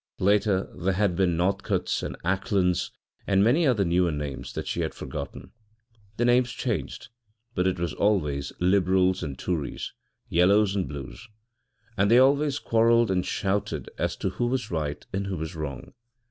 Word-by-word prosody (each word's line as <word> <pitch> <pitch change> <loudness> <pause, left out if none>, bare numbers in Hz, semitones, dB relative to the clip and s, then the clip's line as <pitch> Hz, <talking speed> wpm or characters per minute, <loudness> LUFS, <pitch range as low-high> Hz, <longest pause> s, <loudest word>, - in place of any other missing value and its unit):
Later 100 0 +2
there 90 +2 0
had 100 -2 +1
been 90 -2 +1
Northcotes 90 +3 0
and - - -5
Aclands, 95 -1 +1 0.4
and 95 0 +4
many 145 +9 +4
other 110 -7 +2
newer 85 0 +2
names 75 -3 -5
that - - -4
she - - -2
had - - -3
forgotten; 70 +2 -7 0.7
the 120 - +1
names 120 0 +4
changed, 120 -6 -3 0.4
but 90 +1 +1
it 95 - 0
was 85 -2 -2
always 75 -10 0
Libruls 95 0 +3
and 70 -6 -5
Toories, 80 -4 -3 0.3
Yellows 100 +4 +3
and 95 -2 -1
Blues. 70 - -8 0.7
And 100 +1 +3
they 115 - +6
always 140 +2 +4
quarrelled 115 -3 +3
and 90 -1 +1
shouted 100 +2 -2
as - - 0
to - - -2
who 120 +5 -1
was 125 -3 -2
right 75 -3 -3
and 95 +1 -2
who 95 -2 -3
was 80 +3 -5
wrong. 70 -5 -6
95 Hz, 160 wpm, -26 LUFS, 85-105 Hz, 0.7 s, they